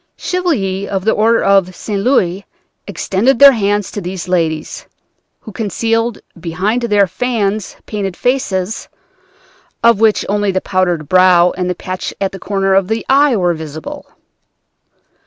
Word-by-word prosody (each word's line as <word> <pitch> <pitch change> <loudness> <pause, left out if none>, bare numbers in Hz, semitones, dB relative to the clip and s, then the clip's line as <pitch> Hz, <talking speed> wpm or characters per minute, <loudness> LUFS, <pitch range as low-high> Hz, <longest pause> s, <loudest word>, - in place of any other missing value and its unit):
Chevaliers 200 - -2
of 190 -1 -3
the 220 - +4
Order 230 +2 +2
of 195 -2 +2
St. 200 +2 -4
Louis 195 -6 +1 0.4
extended 235 +7 0
their 280 +1 +9
hands 205 -4 -1
to 205 - -5
these 180 0 -6
ladies, 165 -4 -2 0.5
who 220 - -10
concealed 225 +2 -1 0.2
behind 185 +8 -1
their 210 -4 +3
fans 210 0 -2
painted 195 -4 -4
faces, 220 -6 -1 0.9
of 230 -3 +5
which 220 -2 +2
only 205 0 0
the 190 - 0
powdered 180 -5 -1
brow 180 0 +5
and 180 0 -3
the 180 - -1
patch 185 +1 -6
at 195 -1 -1
the 195 - -9
corner 195 0 0
of 190 -1 +2
the 220 +2 -2
eye 275 -1 +4
were 180 -4 +1
visible! 155 -1 -8
195 Hz, 145 wpm, -15 LUFS, 185-225 Hz, 0.9 s, their